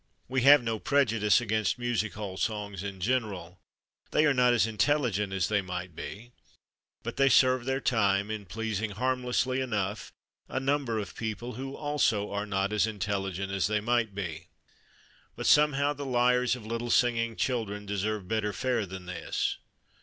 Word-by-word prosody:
We 130 +1 0
have 140 +1 +7
no 115 -2 -2
prejudice 115 -9 +3
against 110 -2 0
music 120 -4 -1
hall 100 -3 -5
songs 100 -2 -3
in 100 -2 -6
general. 95 -6 -2 0.5
They 155 - +3
are 145 - +4
not 125 -1 +4
as 120 -2 +3
intelligent 110 -3 +1
as 95 -2 0
they 105 -2 +1
might 90 -2 -6
be, 120 +9 -8 0.7
but - - -5
they 135 0 +5
serve 130 -2 +4
their 135 0 0
time 100 -5 +1
in 105 -3 -5
pleasing, 110 +2 -2
harmlessly 130 +2 0
enough, 105 -5 -2 0.4
a - - -1
number 135 -4 0
of 105 -2 -5
people 115 +2 -4
who 135 +3 -6
also 140 -9 0
are 100 +1 -3
not 100 +1 -1
as 105 +1 +2
intelligent 100 -3 -3
as 100 -1 +1
they 105 0 +1
might 110 -2 0
be. 85 -6 -5 0.9
But - - -5
somehow 145 -1 +4
the 145 0 -7
lyres 125 0 +3
of 120 -4 -10
little 115 +2 -3
singing 115 -1 +2
children 105 -5 -2
deserve 100 0 -2
better 105 0 -1
fare 120 -2 -1
than 95 0 -8
this. 90 0 -2
110 Hz, 165 wpm, -29 LUFS, 100-125 Hz, 0.9 s, have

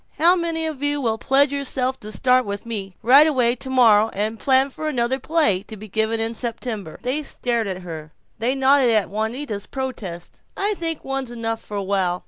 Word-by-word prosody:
How 345 +3 +5
many 335 -2 -1
of 310 -4 -4
you 290 0 0
will 225 -4 -1
pledge 275 +3 +3
yourselves 265 -2 -1
to 215 - -8
start 250 +5 +3
in 250 - -10
with 200 +2 -5
me, 200 -5 -5
right 275 +7 +7
away, 250 -6 +2
tomorrow, 235 -5 +4
and 215 +2 -2
plan 265 0 +3
for 310 - -5
another 260 -2 0
play, 295 - +1
to 220 - -9
be 215 +2 -10
given 220 +2 -1
in 225 +1 -1
September?" 225 -6 -4
They 260 +5 -1
stared 240 -5 -2
at 185 -1 -5
her; 160 -3 -8 0.3
they 245 +4 0
nodded 270 -1 +4
at 215 -4 +2
Juanita's 220 0 -3
protest: 215 -10 -6 0.2
"I 410 +2 +1
think 330 -3 -4
one's 270 -2 -2
enough 225 -1 -3
for 205 - -7
a 200 - -2
while. 190 -2 0
240 Hz, 200 wpm, -22 LUFS, 215-270 Hz, 0.3 s, right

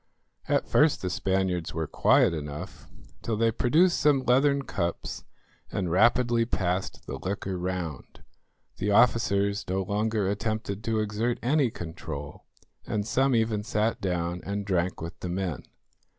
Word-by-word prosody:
At - - +1
first 150 -6 +3
the 90 - -1
Spaniards 95 -4 -1
were 80 -1 -1
quiet 75 - +3
enough, 75 +4 -7 0.3
till 110 -2 -2
they 115 +1 +3
produced 160 +11 +3
some 145 -3 +3
leathern 140 +3 +3
cups 85 -9 -3 0.5
and 90 -4 -2
rapidly 120 +4 +4
passed 95 -4 -2
the 70 - -6
liquor 95 +1 -3
round. 90 -6 -5 0.5
The 100 - -1
officers 100 -2 +3
no 95 +1 0
longer 105 +1 0
attempted 105 0 -2
to 110 -1 +1
exert 110 +3 -1
any 135 +1 +3
control, 80 -6 -7 0.4
and 105 -1 -1
some 130 +2 +2
even 110 -2 +1
sat 110 0 0
down 90 -2 -2
and 100 0 -3
drank 90 -3 -1
with 85 +1 -7
the 90 - -5
men. 90 -4 -3
100 Hz, 140 wpm, -27 LUFS, 90-115 Hz, 0.5 s, rapidly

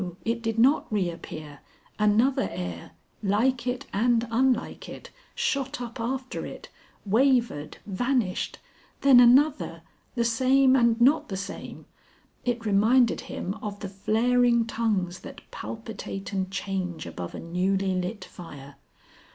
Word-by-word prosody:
it 230 0 -1
did 225 -1 -2
not 260 +4 +3
reappear! 165 -6 -4 0.4
Another 230 +6 +3
air 90 -2 -6 0.3
like 235 +5 +1
it 245 0 -2
and 235 +2 +2
unlike 255 +1 0
it, - - -10 0.2
shot 295 - -1
up 240 0 -7
after 255 +3 -3
it, - - -9 0.4
wavered, 230 - +1
vanished. 210 -1 -1 0.4
Then 270 -3 +7
another, 245 - +4 0.3
the 235 -1 +1
same 260 +3 +4
and 235 -2 +3
not 270 +5 +4
the 190 - -3
same. 200 - -7 0.6
It 240 -2 -2
reminded 220 +4 +3
him 185 - -5
of 205 -1 -5
the 200 - -4
flaring 235 +4 +2
tongues 205 -6 -1
that 280 0 -10
palpitate 220 -3 -7
and 190 -1 -1
change 190 -4 -3
above 85 -1 -7
a - - -6
newly 190 +3 0
lit 185 +4 -3
fire. 140 -5 -11
225 Hz, 125 wpm, -26 LUFS, 190-250 Hz, 0.6 s, Then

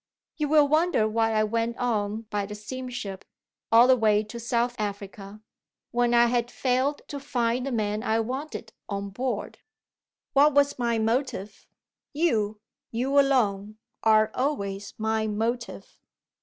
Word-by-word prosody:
"You 300 -2 0
will 300 -1 +5
wonder 310 -6 +2
why 225 +1 +1
I 215 0 +3
went 230 +2 -1
on 215 -3 -1
by 205 -1 -1
the 210 - -7
steamship 215 -3 -6 0.5
all 230 +2 +8
the 260 0 +6
way 215 -3 +3
to 225 +3 -8
South 240 +1 0
Africa 200 0 -6 0.5
when 240 0 +2
I 235 0 +6
had 240 0 0
failed 260 +3 0
to 285 - -5
find 250 -2 -1
the - - -2
man 210 -2 -1
I 225 -1 +1
wanted, 250 -1 -5 0.2
on 200 -1 -4
board. 240 0 -3 0.7
What 285 +1 +5
was 285 -2 +3
my 235 -1 +1
motive? 225 -3 -2 0.5
You, 220 -10 0 0.3
you 265 +5 +1
alone, 215 -7 +1 0.2
are 215 -1 +4
always 200 -8 -2
my 220 0 0
motive. 230 +3 -3
230 Hz, 140 wpm, -26 LUFS, 215-255 Hz, 0.7 s, all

